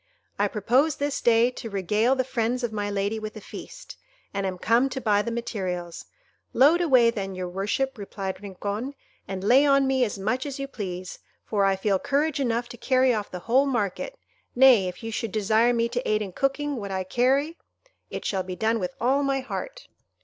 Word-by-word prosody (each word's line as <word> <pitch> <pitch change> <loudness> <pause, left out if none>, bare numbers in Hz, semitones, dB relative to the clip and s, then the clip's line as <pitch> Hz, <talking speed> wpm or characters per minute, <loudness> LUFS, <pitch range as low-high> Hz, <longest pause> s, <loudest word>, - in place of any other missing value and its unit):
I 205 - +3
propose 250 +9 +2
this 285 0 -2
day 235 +1 +4
to 235 -2 -7
regale 210 +6 +1
the 260 - +1
friends 245 0 -1
of 235 -2 -2
my 205 -1 -2
lady 200 +2 -1
with 215 0 -7
a - - -6
feast, - - -10 0.4
and 195 -1 -1
am 185 -1 -4
come 235 +8 +2
to 265 - -4
buy 210 -4 +2
the 235 - -3
materials." 185 -7 -4 0.5
"Load 300 +8 +5
away, 255 -8 +5
then, 195 -4 -4
your 185 0 -4
worship," 210 +8 -2
replied 195 -1 -5
Rincon, 205 +7 -5 0.3
"and 190 -1 -5
lay 250 +7 +5
on 275 -1 +4
me 265 -1 +2
as 215 -4 -2
much 245 +8 -1
as 275 - -5
you 275 0 -4
please, 185 -7 -6 0.3
for 200 -2 +1
I 195 0 +3
feel 195 0 +1
courage 290 +4 0
enough 240 -2 0
to 240 - -9
carry 255 +1 +3
off 210 -2 -3
the 180 - -7
whole 265 +4 +3
market; 240 - -2 0.4
nay, 245 -7 +6
if 180 +5 -7
you 225 - -4
should 225 -1 -3
desire 220 +3 +3
me 235 -1 +1
to 245 +1 -2
aid 215 0 +2
in 195 - -7
cooking 275 +5 -1
what 200 -3 -5
I 190 -1 -2
carry, 270 - +1 0.5
it - - -6
shall 190 -2 0
be 185 0 -6
done 225 +3 +1
with 180 -2 -4
all 265 +4 +2
my 275 -1 0
heart." - - -6
230 Hz, 205 wpm, -25 LUFS, 200-265 Hz, 0.5 s, nay